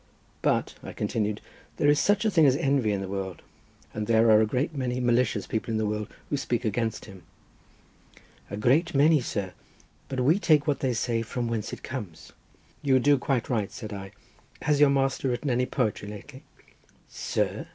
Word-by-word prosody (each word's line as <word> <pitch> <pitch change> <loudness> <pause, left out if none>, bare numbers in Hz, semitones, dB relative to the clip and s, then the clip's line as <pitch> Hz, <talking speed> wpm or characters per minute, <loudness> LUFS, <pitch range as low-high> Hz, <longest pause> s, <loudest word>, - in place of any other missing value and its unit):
But," - - +1
I - - -8
continued, 105 -1 -2 0.4
"there - - +2
is 145 0 +5
such 205 +2 +2
a 215 - +3
thing 160 -6 +5
as 130 - +4
envy 135 -7 +1
in 100 -1 -1
the 95 - -4
world, 95 -2 -5 0.5
and 105 -1 -3
there 115 0 +4
are 110 0 +7
a 110 - +2
great 130 +8 -1
many 125 -2 -2
malicious 120 -4 +1
people 110 +1 -3
in 110 - 0
the 110 - 0
world, 105 0 -2 0.2
who 145 - +1
speak 120 -4 -2
against 110 +1 -1
him." 95 -4 -12 1.3
"A 100 - -5
great 145 +10 +2
many, 150 +1 +5
sir, 100 -6 -4 0.6
but 130 - -3
we 155 +10 +3
take 155 -6 +3
what 145 -4 0
they 130 -2 0
say 115 0 -1
from 120 +2 -3
whence 115 -2 -3
it - - -8
comes." 105 - -7 0.5
"You 135 -3 +3
do 140 +2 +4
quite 125 -2 -1
right," 110 -6 -1
said 110 -5 -7
I. 95 -1 -7 0.5
"Has 150 -1 +2
your 145 -1 +6
master 135 -1 +1
written 125 +3 -1
any 125 +1 +1
poetry 110 -5 -1
lately?" 120 +7 -10 0.7
"Sir!" - - -2
120 Hz, 190 wpm, -27 LUFS, 105-140 Hz, 1.3 s, are